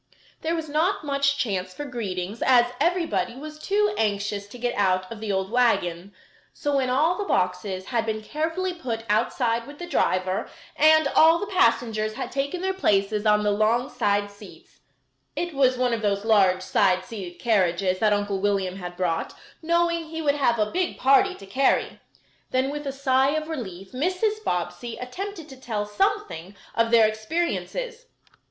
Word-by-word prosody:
There 325 +1 -1
was 325 -1 -4
not 320 +7 0
much 280 -1 +1
chance 190 -8 -2
for 290 - -5
greetings 205 -5 -4
as 245 -2 +4
everybody 340 -8 0
was 305 +3 -9
too 410 +4 +1
anxious 205 -1 -1
to 225 - -11
get 245 0 -1
out 185 -2 +1
of 230 - -7
the 215 -1 -3
old 190 +1 -1
wagon. 200 -7 +1 0.4
So, 290 -2 0
when 260 -2 +1
all 310 +9 +2
the - - 0
boxes 185 - -1
had 230 -1 -1
been 220 0 -2
carefully 325 +8 -2
put 240 -10 -4
outside 230 +2 0
with 290 +1 -11
the 350 - -6
driver, 185 - 0 0.3
and 315 0 +5
all 325 +3 +6
the 410 - -3
passengers 225 - +1
had - - -5
taken 280 +6 -2
their 380 0 0
places 210 - +1
on 210 0 +4
the 210 - +2
long 225 +5 +1
side 205 -3 0
seats 200 - -15 0.6
(it 345 -1 -3
was 260 -2 +3
one 250 -1 +1
of 230 - -1
those 200 -1 0
large 190 -4 +4
side 185 -2 +2
seated 185 -5 -8
carriages 185 -2 +1
that 215 -1 +3
Uncle 205 -1 0
William 195 -2 0
had 180 -2 -7
brought, 170 -3 -1 0.3
knowing 340 0 +1
he 320 +1 -7
would 295 -3 +2
have 265 -5 +1
a 210 -1 0
big 365 0 -1
party 325 +9 +4
to 195 - -12
carry), 260 +8 +1 0.5
then 260 +2 0
with 295 0 -5
a - - -1
sigh 270 +1 +2
of 310 0 -2
relief 195 - -6
Mrs. 370 - -1
Bobbsey 225 - -3
attempted 340 +6 -6
to 265 - -11
tell 215 -5 -2
something 210 - -2 0.2
of 230 0 +2
their 230 -1 +6
experiences. 345 - -3
240 Hz, 175 wpm, -25 LUFS, 205-310 Hz, 0.6 s, all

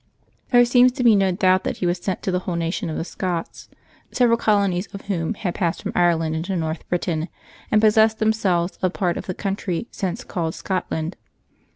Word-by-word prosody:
There 245 -1 +6
seems 245 +1 +5
to 250 - -2
be 230 -3 +6
no 195 -1 +3
doubt 185 0 +3
that - - -3
he - - -2
was 175 +1 0
sent 185 0 -3
to 190 - -1
the 180 - +1
whole 180 -1 -4
nation 170 +2 -2
of 155 - -4
the - - -2
Scots, 175 -2 -4 0.4
several 240 -2 +3
colonies 200 -4 +1
of 200 - -7
whom 190 +1 -2
had 180 -4 -3
passed 170 -3 -2
from - - -3
Ireland 165 -2 +2
into 175 +4 -2
North 160 -1 -3
Britain, 170 -2 -1 0.4
and 215 - +5
possessed 220 0 +4
themselves 195 -5 +1
of 185 0 +1
part 175 -3 0
of - - -6
the 185 - -3
country 195 0 -3
since 190 -4 -3
called 165 -2 -3
Scotland. 180 -3 -3
185 Hz, 200 wpm, -22 LUFS, 170-210 Hz, 0.4 s, There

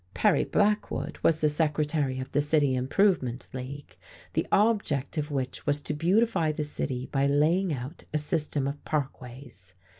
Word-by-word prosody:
Perry - - +3
Blackwood 210 0 0
was 160 -1 +3
the 155 - +4
Secretary 150 -3 0
of 130 - -6
the 145 - +2
City 145 -2 +2
Improvement 130 - +1
League, 135 +2 -7 0.4
the - - 0
object 200 - +2
of 150 -1 -2
which 130 -1 -4
was 145 0 +2
to 150 - -4
beautify 175 +1 +2
the 150 0 -3
city 130 -3 -3
by 140 0 +2
laying 160 +6 +2
out 135 +3 -6
a 155 - +1
system 150 -2 -1
of 140 +1 -5
parkways. 125 - -5
145 Hz, 155 wpm, -28 LUFS, 130-160 Hz, 0.4 s, the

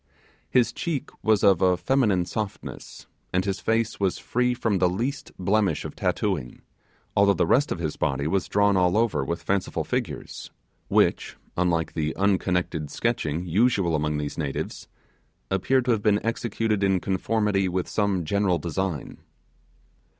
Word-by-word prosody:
His 125 -2 +3
cheek 160 -6 -3
was 110 -2 +2
of 95 -3 +5
a 90 -1 +4
feminine 105 -10 +2
softness, 100 +2 -6 0.3
and 90 +1 +1
his 100 -1 -1
face 115 +1 0
was 95 -2 +1
free 125 0 0
from 110 -5 0
the 90 0 +3
least 120 +10 -3
blemish 100 +2 +1
of - - -7
tattooing, 60 -1 -2 0.5
although 100 0 +4
the 85 - +2
rest 140 - +3
of - - -1
his 80 -3 -3
body 70 +1 -1
was 95 +4 0
drawn 100 0 +3
all 90 +1 +3
over 110 -12 +1
with 85 +5 -4
fanciful 100 -1 -1
figures, - - -4 0.4
which - - +1 0.2
unlike 85 -2 0
the 80 -1 -2
unconnected 90 -5 0
sketching 90 -8 -1
usual 95 -2 +2
among 75 0 0
these 75 +2 -4
natives 70 -3 -4 0.6
appeared 125 +7 +2
to 125 - +2
have 110 -3 +1
been 105 -1 +3
executed 115 -2 -1
in 95 -1 +3
conformity 100 +1 0
with 90 0 -2
some 100 -5 0
general 100 +1 +1
design. 85 -1 -3
95 Hz, 150 wpm, -25 LUFS, 85-110 Hz, 0.6 s, of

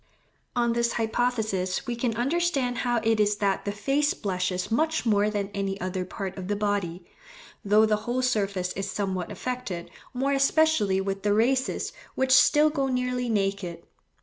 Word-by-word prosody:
On 235 -1 +2
this 235 0 +1
hypothesis 220 -5 -1
we 240 -2 -2
can 235 -1 -1
understand 270 -2 0
how 240 -2 +1
it 225 -1 +2
is 210 0 +3
that 200 -2 0
the 205 - -1
face 275 +9 0
blushes 185 -1 -2
much 315 +6 +1
more 210 -2 +3
than 205 -2 -2
any 195 0 -2
other 185 0 -3
part 190 0 -5
of 180 - -6
the 205 - 0
body, 200 -4 -2 0.6
though 210 +2 +5
the 215 -1 +2
whole 240 +4 -2
surface 200 -7 0
is 195 +1 -4
somewhat 190 -3 -3
affected, 250 -9 -5 0.2
more 265 +2 -1
especially 275 -8 +3
with 195 0 -3
the 205 0 +2
races 260 +4 +1 0.2
which 265 0 0
still 300 +3 +6
go 275 -3 0
nearly 250 -1 -1
naked. 195 -5 -1
215 Hz, 165 wpm, -26 LUFS, 195-250 Hz, 0.6 s, still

